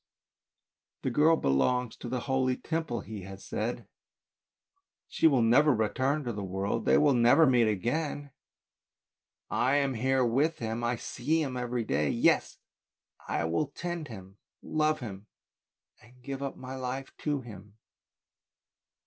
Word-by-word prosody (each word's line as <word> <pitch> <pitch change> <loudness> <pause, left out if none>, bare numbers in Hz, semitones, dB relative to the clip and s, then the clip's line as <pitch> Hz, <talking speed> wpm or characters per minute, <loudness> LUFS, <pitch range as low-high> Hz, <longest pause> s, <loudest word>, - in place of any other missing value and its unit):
" - - -62
The 130 - 0
girl 155 +5 +5
belongs 115 - +1
to 120 - -7
the 125 0 -2
holy 130 -1 0
Temple, 160 -8 -3
he 110 -2 -8
has 95 +1 -10
said, 115 +3 -3 1.2
she - - +3
will 135 -6 +3
never 130 +5 +5
return 130 +7 0
to 120 -2 -3
the 100 -1 -5
world, 95 +4 -2
they - - +5
will 145 -2 +4
never 120 +6 +5
meet 125 -4 +4
again, 140 - -2 1.2
I 130 +3 +2
am 140 -2 +1
here 130 +2 +1
with 145 +8 +1
him, 115 +1 -3
I 120 +1 +1
see 150 +7 -1
him 130 -3 -4
every 125 -1 -2
day. 75 -6 0
Yes! - - +2 0.7
I - - -1
will 85 - 0
tend 170 +2 -5
him, 95 -3 -11 0.2
love 155 -1 0
him, 100 -3 -8 0.7
and 120 +3 -20
give 135 0 -5
up 140 -1 -4
my 130 0 -8
life 130 +1 -5
to 145 -2 -2
him." 105 -3 -12
125 Hz, 150 wpm, -29 LUFS, 110-140 Hz, 1.2 s, girl